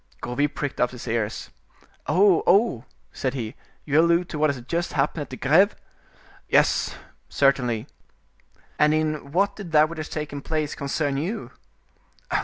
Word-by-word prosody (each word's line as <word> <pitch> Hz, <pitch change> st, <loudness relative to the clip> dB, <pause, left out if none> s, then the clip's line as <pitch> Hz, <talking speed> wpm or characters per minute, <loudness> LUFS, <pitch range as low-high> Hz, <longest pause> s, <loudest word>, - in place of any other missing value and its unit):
'" -, -, -34 dB
Gourville 125 Hz, +5 st, 0 dB
pricked 145 Hz, -1 st, -4 dB
up 125 Hz, -, +3 dB
his 125 Hz, 0 st, -10 dB
ears. 115 Hz, -2 st, -2 dB, 0.6 s
"Oh, 190 Hz, -2 st, +4 dB
oh!" 185 Hz, -, +3 dB, 0.3 s
said 130 Hz, 0 st, -3 dB
he, 115 Hz, -3 st, -4 dB, 0.3 s
"you 150 Hz, +1 st, +3 dB
allude 170 Hz, +1 st, +2 dB
to 150 Hz, -, -5 dB
what 155 Hz, 0 st, +3 dB
has 140 Hz, -3 st, -2 dB
just 170 Hz, +3 st, -2 dB
happened 145 Hz, +2 st, 0 dB
at 145 Hz, -, -6 dB
the 130 Hz, -, -7 dB
Greve?" 175 Hz, +9 st, +4 dB, 0.7 s
"Yes, -, -, +2 dB, 0.3 s
certainly." 125 Hz, -5 st, +1 dB, 0.9 s
"And 150 Hz, +1 st, +4 dB
in 155 Hz, -2 st, -2 dB
what 200 Hz, +4 st, +1 dB
did 185 Hz, -6 st, -9 dB
that 155 Hz, 0 st, +5 dB
which 170 Hz, -, -8 dB
has 155 Hz, -, -5 dB
taken 150 Hz, -2 st, -5 dB
place 155 Hz, 0 st, -2 dB
concern 140 Hz, 0 st, -2 dB
you?" 185 Hz, +11 st, -4 dB
150 Hz, 160 wpm, -24 LUFS, 135-170 Hz, 0.9 s, that